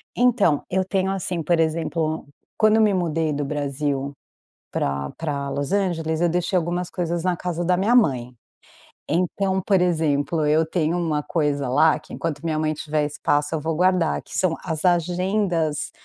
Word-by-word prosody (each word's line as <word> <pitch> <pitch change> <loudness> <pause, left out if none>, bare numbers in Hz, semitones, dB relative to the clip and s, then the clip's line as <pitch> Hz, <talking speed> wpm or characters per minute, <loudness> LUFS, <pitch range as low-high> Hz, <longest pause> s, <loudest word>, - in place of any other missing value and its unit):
então, 230 - +3
eu 190 +1 +1
tenho, 190 0 0
assim, 180 -3 -2
por 170 +2 +2
exemplo, 160 0 -1 0.3
quando 215 0 +4
eu - - +4
me 210 -2 +4
mudei 165 -4 0
do 145 0 -2
Brasil 140 -1 -2 0.6
pra 70 0 -2
pra 140 -3 -3
Los 140 +2 -3
Angeles 165 -5 0
eu 175 - +3
deixei 180 +3 -1
algumas 175 +1 0
coisas 170 -1 -2
na 180 -1 +1
casa 175 -1 -3
da 180 +1 +3
minha 220 +6 +3
mãe. 130 - +2 0.8
Então, 190 +3 0
por 190 -1 +2
exemplo, 155 -3 +1
eu 155 +2 +3
tenho 160 0 0
uma 160 -4 0
coisa 145 -4 0
lá 155 +4 +4
que - - -12
enquanto 155 -4 -3
minha 160 -2 0
mãe 155 0 0
tiver 150 0 -1
espaço 145 +1 0
eu 155 - -1
vou 160 +1 -2
guardar 180 -1 +2
que - - -7
são 175 -3 +1
as 160 -1 -3
agendas, 175 -2 +1
165 Hz, 170 wpm, -23 LUFS, 150-180 Hz, 0.8 s, quando